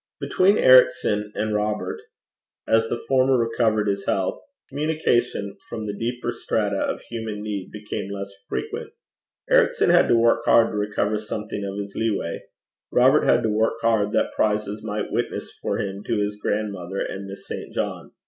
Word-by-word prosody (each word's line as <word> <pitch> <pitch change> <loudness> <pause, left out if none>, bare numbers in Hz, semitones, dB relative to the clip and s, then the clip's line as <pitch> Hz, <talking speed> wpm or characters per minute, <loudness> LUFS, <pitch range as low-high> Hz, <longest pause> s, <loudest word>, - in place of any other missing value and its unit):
Between 195 +3 +3
Ericson 105 -4 +5
and 110 0 -1
Robert, 105 0 -2 0.7
as 115 0 +3
the 120 - -1
former 130 +1 +2
recovered 115 -2 +1
his 100 0 -2
health, 95 -1 0 0.3
communication 125 -9 0
from 110 -1 -5
the 105 -1 -4
deeper 120 +2 -3
strata 105 -4 -1
of - - -2
human 110 -3 -5
need 100 -3 -4
became 105 -2 -5
less 100 0 -5 0.2
frequent. 445 +1 -4 0.6
Ericson - - +4
had 175 - +5
to 120 - +4
work 115 0 +3
hard 115 -1 +5
to - - -5
recover 105 0 0
something 105 -1 -5
of 100 0 -4
his 100 -1 -5
leeway; 105 -6 -1 0.5
Robert 130 +4 +5
had 120 - +4
to 110 - +1
work 110 +2 +1
hard 110 -3 +2
that - - +1
prizes 105 0 0
might 105 -1 -3
witness - - -2
for - - -1
him 100 0 -4
to 115 - 0
his 105 0 -1
grandmother 100 -4 -2
and 100 0 -4
Miss 100 0 -9
St. - - -6
John. - - -4
105 Hz, 165 wpm, -23 LUFS, 105-120 Hz, 0.7 s, Ericson